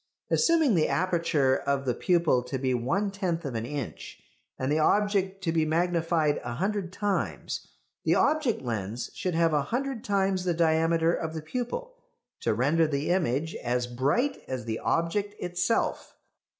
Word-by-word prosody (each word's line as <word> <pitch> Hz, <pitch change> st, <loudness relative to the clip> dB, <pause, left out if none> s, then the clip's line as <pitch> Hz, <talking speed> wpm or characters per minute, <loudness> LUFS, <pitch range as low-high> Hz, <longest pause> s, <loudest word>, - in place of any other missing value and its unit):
Assuming 325 Hz, -7 st, +4 dB
the 160 Hz, -4 st, +3 dB
aperture 165 Hz, -7 st, +2 dB
of 140 Hz, 0 st, -1 dB
the 125 Hz, -, +1 dB
pupil 170 Hz, -3 st, +2 dB
to 135 Hz, +2 st, -3 dB
be 130 Hz, 0 st, 0 dB
one 170 Hz, -, 0 dB
tenth 180 Hz, -5 st, -2 dB
of 135 Hz, -, -3 dB
an 115 Hz, 0 st, -3 dB
inch, 140 Hz, -3 st, -6 dB, 0.4 s
and 130 Hz, +2 st, -1 dB
the 155 Hz, -, +2 dB
object 195 Hz, +2 st, +1 dB
to 165 Hz, -, +1 dB
be 160 Hz, -1 st, +2 dB
magnified 165 Hz, -1 st, +1 dB
a 120 Hz, -, -4 dB
hundred 195 Hz, -, -1 dB
times, 200 Hz, 0 st, -2 dB, 0.4 s
the -, -, +3 dB
object 290 Hz, -, +2 dB
lens 110 Hz, -1 st, -3 dB
should 185 Hz, -5 st, -2 dB
have 165 Hz, -1 st, +3 dB
a 150 Hz, -, +3 dB
hundred 245 Hz, -, -3 dB
times 195 Hz, -2 st, +1 dB
the 175 Hz, -2 st, 0 dB
diameter 165 Hz, 0 st, +3 dB
of 160 Hz, -1 st, -3 dB
the 160 Hz, -, -3 dB
pupil 255 Hz, -, -4 dB, 0.5 s
to -, -, 0 dB
render 150 Hz, +7 st, +3 dB
the 145 Hz, 0 st, -2 dB
image 160 Hz, -3 st, 0 dB
as 125 Hz, 0 st, -1 dB
bright 140 Hz, -, 0 dB
as 130 Hz, -3 st, -4 dB
the 115 Hz, -1 st, -3 dB
object 200 Hz, +5 st, 0 dB
itself. 180 Hz, +6 st, -1 dB
165 Hz, 165 wpm, -28 LUFS, 140-195 Hz, 0.5 s, Assuming